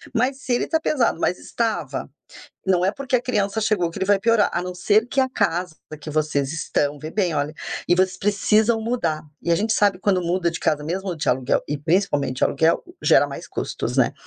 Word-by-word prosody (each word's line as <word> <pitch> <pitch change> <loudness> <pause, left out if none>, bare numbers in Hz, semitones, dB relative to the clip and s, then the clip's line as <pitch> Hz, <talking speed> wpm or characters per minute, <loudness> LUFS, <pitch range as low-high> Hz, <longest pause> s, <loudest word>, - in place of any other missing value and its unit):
mas, 265 +4 0
se 255 - -1
ele 240 - 0
tá 320 - +1
pesado, 260 - +1
mas 180 - +1
estava, 175 - -3 0.6
não 185 -2 +2
é 195 - +2
porque 275 -1 0
a - - 0
criança 210 -4 0
chegou 195 -6 +1
que 170 - -8
ele 190 - 0
vai 200 -1 +3
piorar, 230 0 +3
a - - -1
não 180 - -5
ser 215 +5 +2
que 275 - +1
a 260 - +2
casa 175 -8 -1 0.3
que 155 - -9
vocês 150 -2 0
estão, 145 -2 -1
vê 155 - -6
bem, 180 -4 0
olha, 145 +1 -1 0.4
e 175 - +4
vocês 185 0 +2
precisam 215 +3 +2
mudar. 220 -10 -1 0.2
E - - -2
a 170 - +4
gente 220 +2 0
sabe, 205 -4 +2
quando 190 -1 +1
muda 175 +1 0
de - - -5
casa, 150 -1 0
mesmo 185 +2 -3
de 155 - -2
aluguel, 125 +1 +1
e 150 - -2
principalmente 145 -4 0
de - - +2
aluguel, 160 +4 +2 0.2
gera - - +5
mais - - -8
custos, - - -4
né? - - +3
185 Hz, 220 wpm, -22 LUFS, 160-220 Hz, 0.6 s, gera